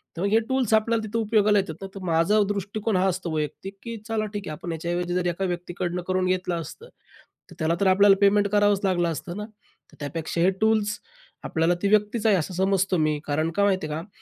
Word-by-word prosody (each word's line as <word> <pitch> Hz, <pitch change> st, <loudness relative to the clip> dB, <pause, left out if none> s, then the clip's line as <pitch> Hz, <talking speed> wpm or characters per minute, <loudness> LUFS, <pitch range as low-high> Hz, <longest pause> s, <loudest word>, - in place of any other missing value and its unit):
तर 170 Hz, -, -5 dB
मग 200 Hz, -, +1 dB
हे 220 Hz, +2 st, +4 dB
टूल्स 260 Hz, -4 st, +1 dB
आपल्याला 220 Hz, +1 st, +2 dB
तिथं 220 Hz, +2 st, -2 dB
उपयोगाला 210 Hz, -2 st, +3 dB
येतात 175 Hz, -5 st, -3 dB
ना. 195 Hz, -, -5 dB
तर 195 Hz, -, -6 dB
माझा 170 Hz, +5 st, +3 dB
दृष्टिकोन 205 Hz, +2 st, -2 dB
हा 185 Hz, +1 st, +2 dB
असतो 180 Hz, -2 st, -2 dB
वैयक्तिक 155 Hz, +6 st, -4 dB
की 230 Hz, -1 st, -6 dB
चला 220 Hz, -2 st, -1 dB
ठीक 205 Hz, -2 st, -5 dB
आहे -, -, -4 dB
आपण 170 Hz, +3 st, -6 dB
याच्याऐवजी 175 Hz, +2 st, -2 dB
जर 180 Hz, 0 st, 0 dB
एका 175 Hz, +2 st, -1 dB
व्यक्तीकडनं 175 Hz, 0 st, -3 dB
करून 185 Hz, 0 st, +1 dB
घेतलं 180 Hz, -2 st, -1 dB
असतं, 460 Hz, -, -11 dB, 0.6 s
तर -, -, -12 dB
त्याला 160 Hz, +1 st, +1 dB
तर 200 Hz, -, +2 dB
आपल्याला 195 Hz, +1 st, +6 dB
पेमेंट 200 Hz, 0 st, +4 dB
करावंच 205 Hz, -1 st, +3 dB
लागलं 175 Hz, -3 st, +1 dB
असतं 175 Hz, +4 st, -6 dB
ना. 210 Hz, -, -4 dB, 0.5 s
तर -, -, -18 dB
त्यापेक्षा 165 Hz, +3 st, -3 dB
हे 180 Hz, -, +5 dB
टूल्स 215 Hz, -1 st, +2 dB, 0.5 s
आपल्याला 165 Hz, +2 st, +1 dB
ती 200 Hz, -, +1 dB
व्यक्तीच 210 Hz, +2 st, +1 dB
आहे 215 Hz, -2 st, +5 dB
असं 185 Hz, +1 st, -2 dB
समजतो 190 Hz, 0 st, +1 dB
मी. 155 Hz, -2 st, +1 dB
कारण 155 Hz, +2 st, 0 dB
काय 200 Hz, +4 st, +2 dB
माहिती 190 Hz, -6 st, +1 dB
आहे 155 Hz, +1 st, -4 dB
का? 175 Hz, -, -13 dB
190 Hz, 220 wpm, -25 LUFS, 170-205 Hz, 0.6 s, आपल्याला